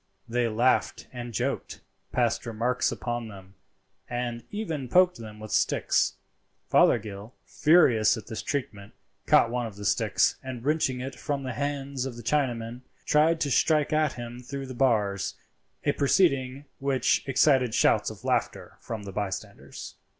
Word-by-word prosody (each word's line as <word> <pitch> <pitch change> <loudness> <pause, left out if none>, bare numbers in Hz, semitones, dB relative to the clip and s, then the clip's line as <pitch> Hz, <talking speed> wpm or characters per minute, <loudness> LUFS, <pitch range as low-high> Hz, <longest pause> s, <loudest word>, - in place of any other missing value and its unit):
They 120 +1 0
laughed 120 +3 +1
and 120 -1 -6
joked, 105 - -3 0.3
passed 120 -1 0
remarks 115 +3 0
upon 120 -1 -4
them, 95 -2 -12 0.6
and 120 -1 -3
even 165 - -4
poked 180 +4 +4
them 105 -2 -9
with 110 0 -9
sticks. - - +2 0.6
Fothergill, 105 +3 +2
furious 125 -9 +4
at 110 - -8
this 110 - -5
treatment, 110 -9 -4 0.3
caught 115 - +5
one 120 -1 -1
of 105 - -10
the 100 0 -8
sticks, - - +2
and 130 -2 -7
wrenching 140 -4 +1
it 135 +1 -5
from 140 +1 -3
the 130 -1 -4
hands 140 0 -3
of 125 - -7
the 120 - -9
Chinaman, 120 -3 -1 0.2
tried 155 +2 +3
to 140 - 0
strike 155 +2 +2
at 155 -2 +2
him 120 0 -7
through 135 +2 -6
the 130 - -7
bars, 105 -6 +1 0.5
a 145 - +3
proceeding 140 -3 +1
which 135 -2 +1
excited 130 -3 +3
shouts - - +3
of - - -11
laughter - - -2
from 110 -3 -6
the 100 - -7
bystanders. 100 -1 -6
125 Hz, 150 wpm, -27 LUFS, 115-140 Hz, 0.6 s, caught